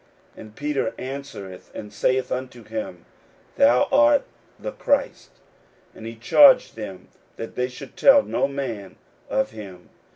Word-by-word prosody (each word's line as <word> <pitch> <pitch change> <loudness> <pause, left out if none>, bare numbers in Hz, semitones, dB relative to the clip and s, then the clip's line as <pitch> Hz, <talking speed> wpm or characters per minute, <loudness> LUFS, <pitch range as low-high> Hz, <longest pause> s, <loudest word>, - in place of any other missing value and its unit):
And 110 -1 -13
Peter 145 0 -2
answereth 130 -9 -8
and 105 -1 -8
saith 130 +5 0
unto 125 -2 -5
him, 275 0 -6 0.5
Thou 280 0 +4
art 290 0 +5 0.3
the - - -6
Christ. 280 - -1 0.6
41:008:030 - - -18
And 110 - -10
he 115 - -7
charged 255 - +5
them 100 -4 -8 0.3
that 115 - -7
they 125 0 -1
should 130 +2 -11
tell 275 0 +6
no - - 0
man 125 -9 -5 0.3
of 110 - 0
him. 100 -5 -11
130 Hz, 140 wpm, -23 LUFS, -, 0.6 s, tell